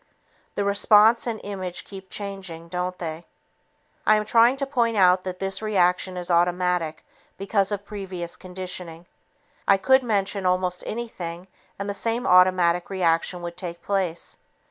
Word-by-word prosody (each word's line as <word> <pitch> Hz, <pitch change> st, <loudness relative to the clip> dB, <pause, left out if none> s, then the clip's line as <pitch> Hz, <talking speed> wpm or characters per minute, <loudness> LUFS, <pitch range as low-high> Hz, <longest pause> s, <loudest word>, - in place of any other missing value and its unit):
The 200 Hz, -, -1 dB
response 210 Hz, +3 st, +5 dB
and 225 Hz, -2 st, -2 dB
image 185 Hz, -3 st, -5 dB
keep 190 Hz, -1 st, -11 dB
changing, 190 Hz, -5 st, -6 dB
don't 180 Hz, +1 st, -3 dB
they? 165 Hz, 0 st, -6 dB, 0.8 s
I 215 Hz, -, +5 dB
am 215 Hz, 0 st, 0 dB
trying 235 Hz, +4 st, +4 dB
to 275 Hz, -, -1 dB
point 235 Hz, -5 st, 0 dB
out 185 Hz, -1 st, +5 dB
that 185 Hz, -1 st, -4 dB
this 195 Hz, +1 st, -3 dB
reaction 185 Hz, -3 st, +1 dB
is 180 Hz, 0 st, -4 dB
automatic 175 Hz, -2 st, +1 dB, 0.3 s
because 195 Hz, 0 st, 0 dB
of 205 Hz, -1 st, -3 dB
previous 190 Hz, -4 st, -6 dB
conditioning. 180 Hz, -2 st, -7 dB, 0.6 s
I 195 Hz, -, +6 dB
could 265 Hz, +7 st, +4 dB
mention 200 Hz, -4 st, -1 dB
almost 180 Hz, 0 st, 0 dB
anything 185 Hz, -6 st, -6 dB, 0.3 s
and 200 Hz, -, -4 dB
the 200 Hz, -, -2 dB
same 230 Hz, +5 st, -1 dB
automatic 180 Hz, -1 st, +4 dB
reaction 175 Hz, -1 st, 0 dB
would 170 Hz, 0 st, -5 dB
take 175 Hz, -2 st, -6 dB
place. 185 Hz, -4 st, -2 dB
185 Hz, 145 wpm, -24 LUFS, 180-205 Hz, 0.8 s, I